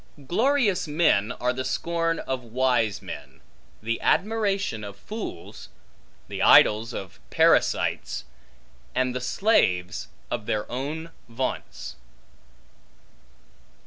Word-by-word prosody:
Glorious 225 - +2
men 145 -9 +2
are 125 0 -1
the 130 +1 -3
scorn 165 +3 -1
of 130 -1 -3
wise 120 -3 +1
men, - - -9 0.4
the 115 +1 -2
admiration 200 - +1
of 100 -1 -8
fools, 210 - -7 0.6
the - - -5
idols 110 +3 +6
of 95 -6 -7
parasites, - - +2 0.7
and 130 0 +1
the 125 - -3
slaves 90 - +1 0.2
of 120 -3 -3
their 105 -1 0
own 150 +6 -4 0.2
vaunts. 125 - -4
130 Hz, 100 wpm, -25 LUFS, 110-170 Hz, 0.7 s, idols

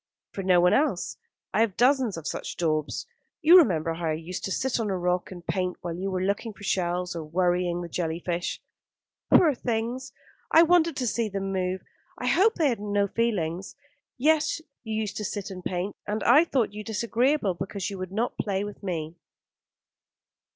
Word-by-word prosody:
"For 195 - -5
no 185 -2 +4
one 180 +1 +4
else. 275 - +1 0.4
I 220 - +3
have 220 -5 +1
dozens 250 -5 +3
of 165 - -8
such - - -4
daubs. 155 -3 -1 0.4
You 330 +4 +8
remember 165 - +2
how 165 0 -3
I 155 - +1
used 165 +3 -5
to 195 - -3
sit 260 +4 0
on 220 -2 -1
a 190 - 0
rock 180 0 0
and 175 -2 -10
paint 185 -1 -1
while 170 -1 -4
you 190 +3 -3
were 185 -1 -1
looking 205 +3 -1
for 205 - -15
shells 180 -2 -1
or 165 - -4
worrying 175 +2 0
the - - -5
jelly 165 -1 -2
fish." 175 0 -3 0.7
"Poor 315 -4 +6
things. 240 +2 -3 0.4
I 325 - +7
wanted 335 -1 +4
to 255 - -1
see 230 -1 0
them 195 -1 -3
move. 185 0 -1 0.3
I - - -5
hope 425 +6 +4
they 310 -5 +3
have 235 - -1
no 205 -1 +1
feelings. 190 -6 -1 0.4
Yes, 310 +4 +2 0.2
you 220 -2 -4
used 210 -1 -3
to 215 - -3
sit 200 -1 -4
and 185 -1 -8
paint; 185 +3 -3
and 210 +1 -2
I 290 +8 +6
thought 245 -10 0
you 210 0 -6
disagreeable 235 +1 +1
because 190 +1 -4
you 195 - -6
would 185 0 -5
not 225 +5 -2
play 200 -1 -1
with 205 0 -8
me." 170 -4 -4
195 Hz, 195 wpm, -26 LUFS, 180-235 Hz, 0.7 s, You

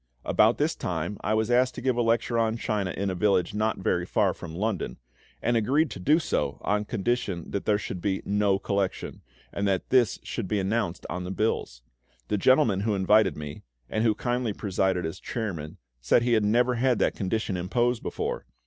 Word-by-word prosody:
About - - +4
this - - +1
time 90 +3 -3
I 110 - +1
was 110 +2 0
asked 125 +1 +3
to - - -5
give 130 -2 +1
a 120 - +1
lecture 115 0 +1
on 115 0 +1
China 105 -4 -1
in 100 +2 -2
a - - -2
village 90 -1 +1
not 110 +1 0
very 90 -2 0
far 95 0 +1
from 80 -2 -9
London, 105 +1 -2 0.5
and 120 - +2
agreed 135 +7 +2
to - - -6
do 150 - +4
so 165 - -1
on 105 0 0
condition 100 -5 -2
that 100 - -3
there 105 -1 +3
should 95 -3 -5
be 95 0 -1
no 100 -1 +2
collection, 100 -1 -2 0.3
and 100 0 -1
that 95 -2 -1
this 125 -6 +4
should - - -4
be 105 +2 0
announced 95 -3 -1
on 90 - -4
the 90 - -5
bills. 95 - -2 0.5
The 105 - +1
gentleman 130 -5 +4
who 105 +1 0
invited 100 +1 +3
me, 75 -1 -7 0.3
and 110 - 0
who 110 -2 +3
kindly 120 -1 -1
presided 95 -3 0
as 80 +3 -5
chairman, 90 -10 -5 0.2
said - - +3
he 120 0 +2
had 110 -2 +3
never 120 +4 +3
had 125 0 +2
that - - +2
condition 105 0 -2
imposed 120 +7 0
before. - - -4
105 Hz, 200 wpm, -27 LUFS, 95-115 Hz, 0.5 s, About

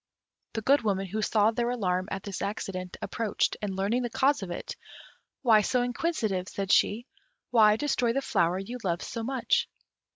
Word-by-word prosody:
The 220 - -3
Good 280 +4 +4
Woman, 195 -3 0
who 210 +4 -3
saw 215 0 +3
their 235 +1 -1
alarm 185 -6 -1
at 195 -1 -4
this 200 -2 -5
accident, 195 -3 -4
approached, 225 -3 -1
and 200 -2 -3
learning 205 +6 0
the 240 - -2
cause 275 +4 +2
of 190 - -5
it, 175 - -5 0.7
"Why 220 -4 +6
so 245 +4 +1
inquisitive" 235 - -1
said 195 -1 -3
she; 230 +4 +3 0.5
"why 215 -3 +6
destroy 245 -2 +1
the 275 +3 -1
flower 170 -5 +1
you 235 +6 -6
loved 175 -2 -1
so 230 - -5
much?" 270 - 0
215 Hz, 175 wpm, -28 LUFS, 195-245 Hz, 0.7 s, Why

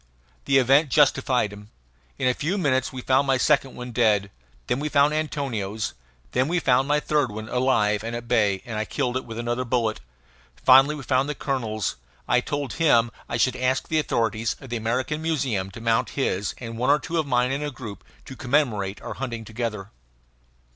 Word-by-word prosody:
The 135 - +4
event 135 +4 +4
justified 130 -6 +2
him. 105 0 -12 0.5
In - - 0
a 125 - +3
few 165 +10 -2
minutes 140 -8 +1
we 130 -1 -7
found 135 +1 +2
my 135 -1 +3
second 140 0 +2
one 125 0 -7
dead. 105 -4 +2 0.3
Then 125 - -1
we 150 +1 -2
found 145 0 +4
Antonio's. 115 -10 -2 0.4
Then 130 - +1
we 175 +3 0
found 130 -3 +2
my 150 0 +3
third 150 -3 +1
one 110 +1 -6
alive 110 -5 +1
and 115 +1 -4
at 120 0 -6
bay, 105 -5 +2
and 115 -3 -4
I 110 - -1
killed 125 +1 -2
it 130 - -2
with 115 -1 -8
another 120 +2 -2
bullet. 115 -3 0 0.6
Finally 135 - +6
we 145 - -8
found 130 +3 +1
the 150 - -2
colonel's. 115 -8 -2 0.3
I 125 0 +3
told 145 0 -3
him 120 -8 +3 0.2
I 115 - -1
should 125 +1 +2
ask 130 +1 0
the 160 - +2
authorities 115 -5 0
of 135 - -12
the - - -1
American 125 +7 -2
Museum 130 -12 -1
to 100 - -10
mount 115 +2 +1
his 105 -7 -1
and 115 -2 -7
one 125 - +1
or 145 - +6
two 165 +2 -3
of 155 - -1
mine 125 -1 +2
in 140 +2 -2
a 150 - -2
group, 115 -6 -9 0.2
to 135 - -9
commemorate 120 -8 0
our - - -5
hunting 120 -4 -5
together. 110 -3 -4
125 Hz, 200 wpm, -24 LUFS, 115-140 Hz, 0.6 s, Finally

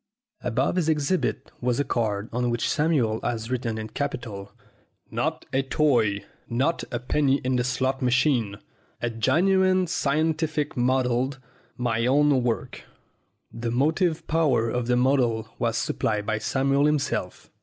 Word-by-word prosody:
Above 125 +8 0
his 165 -3 +1
exhibit 155 +4 0
was 125 0 0
a - - +3
card 110 -5 -1
on 125 +1 0
which 120 -1 0
Samuel 135 -8 +1
had 115 -1 -2
written 120 -3 -2
in 110 0 -5
capitals: 115 -7 -4 0.6
NOT - - -2
A 135 - +3
TOY 120 -8 +1 0.2
NOT 135 +8 0
A 120 - -2
PENNY 135 +2 +1
IN 130 0 0
THE 125 - +1
SLOT 130 +2 -1
MACHIN 125 -5 +2 0.5
A 120 - 0
GENUINE 185 - +3
SCIENTIFIC 155 0 0
MODDLE 130 +1 +1 0.4
MY 115 -1 0
OWN 140 0 +4
WORK 120 -2 -2 0.7
The 115 0 -3
motive 155 - +1
power 140 -8 +2
of 125 0 -2
the 125 0 +2
model 125 -4 +2
was 115 -1 0
supplied 105 -2 -1
by 110 0 -1
Samuel 135 +4 +1
himself. 145 -11 -2
125 Hz, 140 wpm, -25 LUFS, 115-145 Hz, 0.7 s, OWN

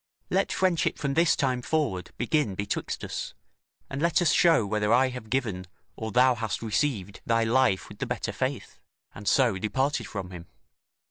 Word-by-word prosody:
Let - - +1
friendship 185 -3 +1
from 140 -1 -2
this 165 +3 +4
time 130 -4 0
forward 125 - -1
begin 125 - 0
betwixt 100 +1 -3
us, - - -5 0.5
and 140 +1 -5
let 170 -1 +3
us 175 - +3
show 165 -10 +4
whether 105 +1 0
I 130 +2 +4
have 125 -3 -8
given, 105 -9 -2 0.3
or 110 0 -5
thou 125 +3 +5
hast 110 -2 -3
received 105 -4 -1
thy 115 0 +3
life 115 -4 +2
with - - -13
the - - -2
better - - -3
faith"; - - -4 0.3
and 100 0 -10
so 120 -4 +3
departed 130 +8 -1
from 95 -3 -6
him. 90 -1 -9
120 Hz, 175 wpm, -27 LUFS, 100-140 Hz, 0.5 s, thou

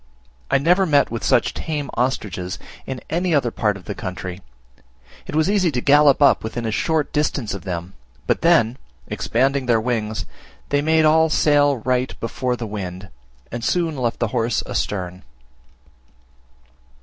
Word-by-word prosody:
I - - +4
never 180 +7 +3
met 145 -6 +3
with 115 - -4
such - - +2
tame 150 -4 -4
ostriches 105 -8 -2 0.3
in 130 -2 -5
any 175 0 +1
other 125 -5 +1
part 105 -3 0
of 90 - -15
the 105 - -4
country: 90 -2 -6 0.9
it - - -5
was 155 +1 +3
easy 195 -3 +2
to 125 - 0
gallop 145 +1 +5
up - - +5
within 115 +1 -4
a 110 - -1
short 155 +6 0
distance 140 -6 -1
of 100 -2 -7
them; 90 0 -5 0.3
but - - 0
then, 135 -8 +3 0.3
expanding 135 +2 0
their 115 -2 +4
wings, 110 -4 -2 0.4
they 145 0 +2
made 160 +1 +3
all 160 +1 +4
sail 145 -2 +3
right 125 +2 -1
before 125 +2 -2
the 120 - -5
wind, 100 -2 -6 0.4
and 120 0 -5
soon 165 +3 0
left 120 -3 -1
the 115 - -1
horse 115 +1 0
astern. 90 -2 -3
125 Hz, 160 wpm, -21 LUFS, 110-150 Hz, 0.9 s, gallop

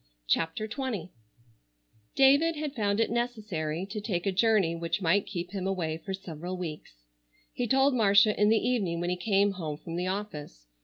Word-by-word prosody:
CHAPTER 165 - 0
XX 225 - -4 1.1
David 285 +5 +5
had 300 -2 -4
found 205 -4 0
it 225 - +1
necessary 210 -9 -2
to 210 +2 -6
take 190 -4 -2
a 195 - +2
journey 195 -4 +2
which 170 +1 -2
might 190 +2 +2
keep 180 -2 -5
him 195 -2 -3
away 170 -5 -2
for 195 - -7
several 180 -1 -7
weeks. 150 - -8 0.5
He 245 - -2
told 270 +3 +3
Marcia 210 -2 +5
in 210 0 +3
the 225 +1 +2
evening 195 -9 0
when 175 +1 -1
he - - 0
came 200 +2 +2
home 160 -6 -5
from 165 +2 -7
the 180 +1 -1
office. 155 - -5
195 Hz, 175 wpm, -28 LUFS, 170-225 Hz, 1.1 s, David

